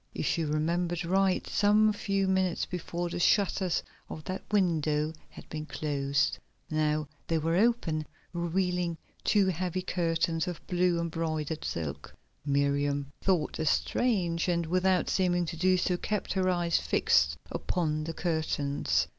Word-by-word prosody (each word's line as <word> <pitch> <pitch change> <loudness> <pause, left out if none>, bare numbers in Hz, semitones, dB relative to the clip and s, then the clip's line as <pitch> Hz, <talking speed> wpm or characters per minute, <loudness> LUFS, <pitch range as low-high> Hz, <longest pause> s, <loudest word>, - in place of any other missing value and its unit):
If - - -2
she 165 - +1
remembered 170 +3 0
right 190 +1 +2
some 210 +1 +4
few 195 -1 0
minutes 190 -2 +1
before 175 0 -4
the - - -3
shutters 190 -1 +2 0.3
of 155 - -7
that 185 +3 -4
window 160 -6 +1 0.2
had - - -13
been 155 0 -5
closed, 140 -2 0 0.3
now 155 -1 +1 0.2
they 165 - +1
were 165 +2 0
open, 190 -8 +1 0.3
revealing 175 0 0 0.3
two 205 -2 +4
heavy 185 +1 -2
curtains 165 -2 0
of 175 -3 -6
blue 180 -1 +1
embroidered 160 -2 -2
silk. 80 -4 -5 0.3
Miriam 140 0 0
thought 180 -6 +1
this 160 -2 +1
strange, 180 -9 +1
and, 170 -1 +1
without 185 +2 +2
seeming 175 -2 +1
to 165 - -5
do 185 +2 +3
so, 180 0 +1
kept 210 +2 -2
her 185 -1 +1
eyes 175 -2 +2
fixed 75 +1 +2
upon 155 -3 -1
the 165 - -4
curtains. 155 -4 0
170 Hz, 140 wpm, -29 LUFS, 155-185 Hz, 0.3 s, some